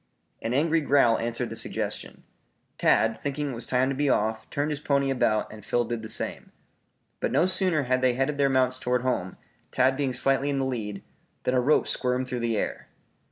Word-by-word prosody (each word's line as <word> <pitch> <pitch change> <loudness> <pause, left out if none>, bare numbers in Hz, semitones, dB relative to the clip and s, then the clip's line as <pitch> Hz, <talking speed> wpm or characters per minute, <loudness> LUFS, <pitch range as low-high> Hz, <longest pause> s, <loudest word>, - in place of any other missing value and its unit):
An 115 +2 -2
angry 160 +3 +2
growl 140 -5 +3
answered 115 0 -3
the - - -5
suggestion. - - -3 0.6
Tad 110 0 +2
thinking 145 0 -2
it - - -5
was 115 - -5
time 130 0 +2
to 135 - -2
be 145 +1 +1
off, 110 -1 0
turned 145 +2 -1
his 145 - -3
pony 140 -2 +1
about 110 -5 0
and 105 -1 -11
Phil 120 +3 0
did 120 0 -4
the 110 - -7
same. - - -2 0.7
But - - -1
no 170 - +3
sooner 185 -5 +1
had 130 0 0
they 130 -1 +3
headed 135 +3 -1
their 140 -1 +3
mounts 130 -1 +2
toward 125 0 0
home, 110 -8 -2 0.3
Tad 130 +1 +2
being 135 -1 -1
slightly 135 +3 +2
in 140 - -1
the 135 - 0
lead, 105 -6 -4 0.4
than 125 - 0
a 125 - +3
rope 145 +5 +3
squirmed 125 0 -1
through 125 -1 -3
the 115 -2 -1
air. - - -3
130 Hz, 205 wpm, -26 LUFS, 120-140 Hz, 0.7 s, growl